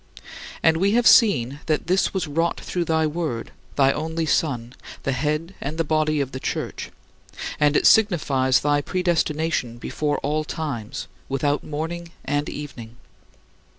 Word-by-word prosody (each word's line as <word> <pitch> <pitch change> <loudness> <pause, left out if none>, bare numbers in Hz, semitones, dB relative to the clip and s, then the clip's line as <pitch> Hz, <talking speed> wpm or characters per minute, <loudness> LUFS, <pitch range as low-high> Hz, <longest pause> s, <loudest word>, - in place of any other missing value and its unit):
And 160 0 +5
we 195 +4 +2
have 240 +1 +3
seen 140 - +5
that 155 -2 0
this 185 +2 +2
was 190 -2 -1
wrought 165 +3 0
through 175 -1 -2
thy 160 -1 +2
Word, 155 -7 -3 0.2
thy 135 -1 +4
only 160 +2 -2
Son, 125 -7 0 0.3
the 135 - 0
head 150 +7 -1
and 150 +3 -4
the 165 - +2
body 155 -1 +1
of 135 -2 -1
the 130 - -5
Church, - - -4 0.7
and 150 0 +4
it - - +1
signifies 140 -11 +4
thy 145 0 +2
predestination 160 -7 0
before 145 +4 -2
all 150 +2 0
times, 145 -9 -5 0.2
without 145 +2 0
morning 165 +3 -4 0.2
and 145 +1 -1
evening. 120 -6 -8
150 Hz, 150 wpm, -23 LUFS, 140-165 Hz, 0.7 s, And